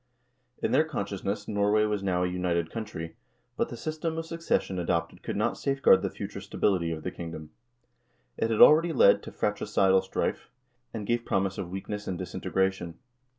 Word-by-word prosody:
In - - +1
their 150 +4 +5
consciousness 100 -9 -4
Norway 105 +1 +2
was 105 -2 -1
now 90 -2 0
a - - +1
united 90 -2 -1
country, 95 -8 -6 0.4
but - - -1
the 120 - -7
system 155 +3 -3
of 165 - -3
succession 165 - -1
adopted 85 -1 -1
could - - -4
not - - 0
safeguard 135 -9 +4
the 95 - -1
future - - -7
stability 90 -5 0
of 80 -1 -5
the 90 - -3
kingdom. 80 -3 -8 0.8
It 115 - -1
had 110 - +2
already 165 +2 +7
led 130 - +6
to - - -9
fratricidal 95 -1 +2
strife, 95 - -3 0.4
and 110 -2 -5
gave 120 +2 0
promise 95 -2 -1
of 85 - -4
weakness 105 +2 -5
and 95 - -2
disintegration. 95 -1 -2
95 Hz, 170 wpm, -28 LUFS, 90-115 Hz, 0.8 s, already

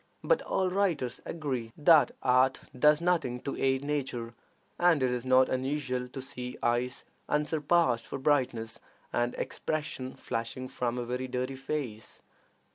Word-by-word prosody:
But - - +3
all 185 -1 0
writers 175 -11 0
agree 130 -8 -3
that 155 0 +6
art 130 +1 +3
does 150 +4 +5
nothing 165 -9 +1
to 140 - -4
aid 135 0 +1
nature, 130 -5 -2 0.5
and 175 -6 +4
it 125 - +2
is 125 0 -2
not 130 0 +5
unusual 130 -1 -1
to 130 +2 -7
see 125 -1 -6
eyes 120 +2 0 0.3
unsurpassed 150 -4 +2
for - - -4
brightness 125 -5 0 0.3
and 120 0 0
expression 150 -4 -3
flashing 115 +3 -4
from 120 0 -2
a 120 - -2
very 125 +2 -3
dirty 130 +1 -2
face. 130 -5 -5
130 Hz, 140 wpm, -30 LUFS, 125-150 Hz, 0.5 s, that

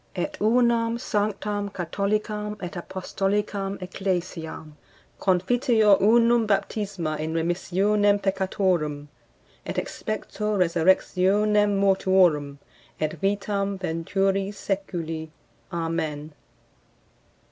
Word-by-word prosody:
Et 300 - -2
unam, 230 +1 +3
sanctam, 205 -2 -2
catholicam 210 +3 -2
et 180 -2 -5
apostolicam 195 +2 -2
ecclesiam. 180 -4 -4 0.4
Confiteor 210 +2 +3
unum 230 +2 +4
baptisma 195 -6 -1
in 160 +1 -3
remissionem 195 +5 +2
peccatorum; 185 -7 -1 0.5
et - - -5
expecto 215 -1 -3
resurrectionem 190 +4 +3
mortuorum, 185 -7 +3 0.4
et 155 0 0
vitam 200 0 -1
venturi 195 +3 0
seculi. 170 -6 -4 0.4
Amen. 160 -3 -3
195 Hz, 75 wpm, -25 LUFS, 175-210 Hz, 0.5 s, unum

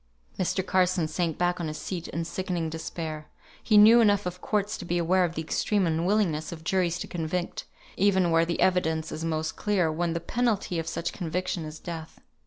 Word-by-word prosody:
Mr. 185 0 0
Carson 185 -3 +2
sank 160 0 -2
back 175 0 +1
on 165 - -2
his 155 0 -5
seat 175 0 -5
in 165 0 -3
sickening 175 -2 -3
despair. 160 -1 -5 0.3
He 215 - +3
knew 225 +3 +8
enough 205 -3 +3
of 180 0 -5
courts 210 0 -1
to - - -6
be 175 0 -1
aware 180 +2 +3
of 170 -1 -1
the 160 - -2
extreme 200 +4 +1
unwillingness 165 -1 +1
of 160 -2 -8
juries 175 -1 +1
to - - -4
convict, 175 +1 -3 0.3
even 190 -3 +3
where 165 0 +4
the 170 0 -2
evidence 160 -4 +1
is 160 - -5
most 160 -1 -2
clear, 190 -6 +1
when 165 +1 -1
the 170 - -1
penalty 215 -4 -1
of 165 - -4
such 170 0 -3
conviction 180 0 -3
is 155 0 -7
death. 165 -1 -8
175 Hz, 195 wpm, -27 LUFS, 160-190 Hz, 0.3 s, knew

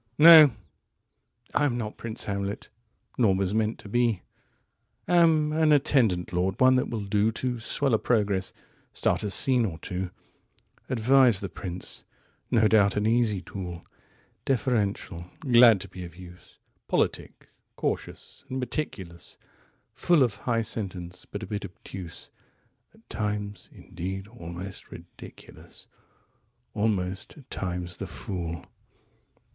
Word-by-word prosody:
"111No! 155 -2 +10 1.0
I 145 - +3
am 125 -4 0
not 110 -3 -4
Prince 115 -1 -6
Hamlet, 100 0 -4 0.5
nor 105 -6 +4
was 95 0 0
meant 110 0 0
to - - -12
be;112Am 150 - 0
an 160 -1 +3
attendant 120 - +2
lord, 90 +2 0
one 130 0 +6
that 125 - 0
will 110 -3 -4
do113To 110 +4 0
swell 135 +3 -1
a 110 - +4
progress, 100 -5 0 0.4
start - - 0
a 105 - -1
scene 125 +4 +2
or 90 -8 -3
two,114Advise 110 +6 -1
the 100 - -4
prince; 90 -1 -6 0.5
no 110 -2 +4
doubt, 100 -3 +4
an 105 - +1
easy 110 -4 +2
tool,115Deferential, 100 +2 -4
glad 120 -6 +6
to 100 - -7
be 90 0 -9
of 85 -1 -10
use,116Politic, 90 0 -4 0.4
cautious, - - -4
and 130 - -3
meticulous;117Full 125 - -3
of 115 -5 0
high 115 +1 -1
sentence, 90 -5 -6
but 100 +1 -6
a - - -3
bit 105 -1 -4
obtuse;118At 95 -2 -12
times, 105 -2 -4
indeed, 95 +3 -6
almost 90 -3 -9
ridiculous - - -13 0.9
119Almost, 100 -2 -1
at 140 - -16
times, 90 -1 -4
the - - -5
Fool. 85 -4 -5
105 Hz, 115 wpm, -27 LUFS, 95-120 Hz, 1.0 s, 111No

